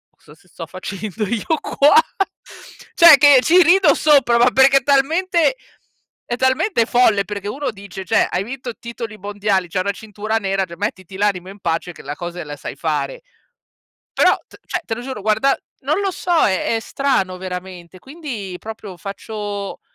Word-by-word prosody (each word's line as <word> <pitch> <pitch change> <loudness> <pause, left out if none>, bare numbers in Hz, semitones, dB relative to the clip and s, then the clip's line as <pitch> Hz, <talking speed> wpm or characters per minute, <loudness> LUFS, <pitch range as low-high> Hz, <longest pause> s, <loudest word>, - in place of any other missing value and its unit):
"Cosa 150 - -19
s 180 - -26
sto 165 -1 -9
facendo 200 +3 -5
io 230 0 -2 0.2
qua." 290 +9 +3 1.0
Cioè 335 -4 +9
che 285 -1 +7
ci 355 +6 +5
rido 375 +3 +5
sopra, 275 -6 +4
ma 240 +1 +4
perché 265 +1 +5
è - - -22
talmente 330 - +2 0.7
è 240 - -2
talmente 260 - +1
folle, 220 -5 +3
perché 205 -1 -6
uno 275 +1 -3
dice 195 -2 -9
cioè - - +2
hai 180 +2 -1
vinto 245 +1 -7
titoli 230 -2 -7
mondiali, 200 -2 -1
c'hai 185 +2 -1
una 200 - -1
cintura 215 +1 -5
nera 195 -2 -1
cioè 170 -1 -11
mettiti 190 -2 -5
l'animo 195 -3 0
in 200 +1 -12
pace, 170 +1 -2
che - - -13
la 145 +2 -5
cose 175 0 -6
la 145 -1 -7
sai - - -7
fare. - - -3 0.9
Però - - +4
t - - -17
cioè 360 - -2
te 225 - -3
lo 240 - -7
giuro 255 -5 -6
guarda 220 +6 +2 0.3
non 300 +8 0
lo 390 - 0
so, 360 0 -4
è 195 +3 0
è - - 0
strano 215 -10 -1
veramente, 180 -1 -8
quindi 260 - -7
proprio 215 -4 -9
faccio 205 0 -6
215 Hz, 175 wpm, -19 LUFS, 190-270 Hz, 1.0 s, Cioè